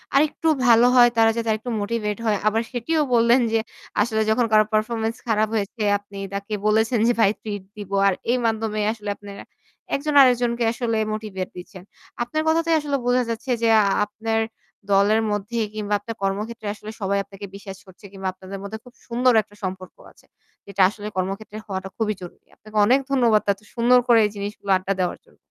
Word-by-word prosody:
আরেকটু 305 +3 +2 0.2
ভালো 235 +1 +6
হয় 240 -1 +7
তারা 225 0 +5
যাতে 230 -1 -1
আরেকটু 220 +3 -3
মোটিভেট 210 -1 -2
হয়। 215 -2 +2
আবার 220 +1 +2
সেটিও 305 +6 0
বললেন 235 +2 +5
যে 225 - +3 0.4
আসলে 220 0 +1
যখন 230 +2 +3
কারো 215 0 +6
পারফরম্যান্স 225 +1 0
খারাপ 220 -1 +2
হয়েছে 210 +2 -2 0.2
আপনি 200 0 -13 0.2
তাকে 200 +2 -5
বলেছেন 220 +2 +2
যে 240 - +4
"ভাই 200 - +5
ট্রিট 205 -3 -5
দিব।" 205 -2 -8 0.2
আর 195 - +3 0.2
এই 250 - +2
মাধ্যমে 220 -1 -1
আসলে 210 -2 -7
আপনারা 200 -1 -10 0.5
একজন 300 +2 -2
আরেকজনকে 245 -2 +3
আসলে 235 -2 -1 0.2
মোটিভেট 205 -4 -5
দিচ্ছেন। 180 +1 -10 0.4
আপনার 275 +6 -2
কথাতেই 330 +1 +2
আসলে 290 -2 -1
বোঝা 250 0 +3
যাচ্ছে 230 +3 -3
যে 230 - +4
আ - - +2 0.2
আপনার 225 +2 -2 0.5
দলের 205 +3 +4
মধ্যে 205 +3 -2
কিংবা 210 -1 -3
আপনার 225 +2 -7
কর্মক্ষেত্রে 210 +3 -3
আসলে 215 0 -9
সবাই 200 0 0
আপনাকে 200 +1 -10
বিশ্বাস 195 -1 -9
করছে 190 +2 -16
কিংবা 195 -1 -5
আপনাদের 190 +1 -9
মধ্যে 205 +2 -6
খুব 250 - -16
সুন্দর 245 +1 +2
একটা 205 - -20
সম্পর্ক 185 -1 -5 0.2
আছে। - - -24 0.4
এটা 200 0 -1
আসলে 210 0 -8
কর্মক্ষেত্রে 195 +3 -4
হওয়াটা 190 -1 -5
খুবই 215 -2 0
জরুরি। 180 - -12
আপনাকে 215 0 -9
অনেক 255 +6 +4
ধন্যবাদ 235 -6 +4
এত 195 - -20 0.2
সুন্দর 245 +1 +5
করে 235 -2 +6
এই 210 - -2
জিনিসগুলো 200 0 -6
আড্ডা 190 +1 -2
দেওয়ার 180 -1 -1
জন্য। - - -26
215 Hz, 185 wpm, -23 LUFS, 200-235 Hz, 0.5 s, হয়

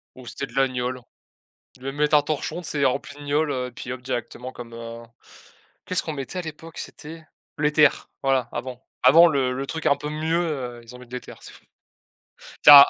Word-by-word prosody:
Ou 130 - -12
c'était 140 - -4
de 120 - -16
la 135 0 +4
gnôle, 125 0 -3 0.8
ils - - -22
devaient 135 +1 -4
mettre 150 +1 +3
un 145 - +5
torchon, 155 +3 -2
tu 160 - -3
sais? 145 -2 +1
Rempli 140 +2 0
de 145 - -11
gnôle, 145 +1 +1
heu, 130 -2 -1
et - - -13
puis, 125 - -6
hop, 125 -1 -7
directement 125 0 -4
comme, 120 -2 -9
heu 115 0 -7 0.8
qu'est - - -3
ce - - +3
qu'on 160 - -4
mettait 140 +6 -5
à - - -4
l'époque? 160 0 -9
C'était, 160 +1 -8 0.3
l'éther, 150 -1 +4
voilà, 135 -3 +2
avant. 125 +1 -5 0.2
Avant 165 +7 +9
le 135 -4 +1
le 135 +2 -3
truc 160 +2 -4
un 140 - +5
peu 150 +1 -5
mieux, 160 +2 0
heu, 130 -8 -3
ils 115 +2 -12
ont - - -13
mis 125 -1 -13
l'éther, 125 +1 -7
c'est - - -10
fou. - - -18 1.0
Tiens 140 -1 +13
135 Hz, 220 wpm, -24 LUFS, 125-150 Hz, 1.0 s, Tiens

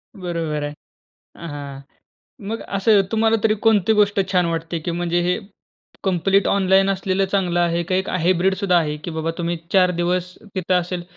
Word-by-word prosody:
बरोबर 165 -5 -3
आहे 145 0 -4 0.7
हां. 140 -2 -7 0.7
मग 225 +1 -3 0.2
असं 200 +1 +4
तुम्हाला 225 0 +3
तरी 215 -1 +4
कोणती 220 -2 +4
गोष्ट 205 0 +2
छान 180 -2 +3
वाटते 165 0 -3
की 165 +2 -4
म्हणजे 175 0 0
हे 180 +1 0 0.7
कंप्लीट 195 +1 +2
ऑनलाईन 195 0 +3
असलेलं 195 0 0
चांगलं 185 -3 0
आहे 170 0 +1
का 175 +2 -2
एक 190 +1 0
हायब्रिड 185 +1 +2
सुद्धा 195 -3 +1
आहे? 150 -2 -1
की 150 +3 -7
बाबा 160 0 -2
तुम्ही 170 0 -1 0.2
4 185 -2 +5
दिवस 180 +1 -1 0.2
तिथं 185 0 0
असेल. 175 0 -5
180 Hz, 165 wpm, -21 LUFS, 170-195 Hz, 0.7 s, 4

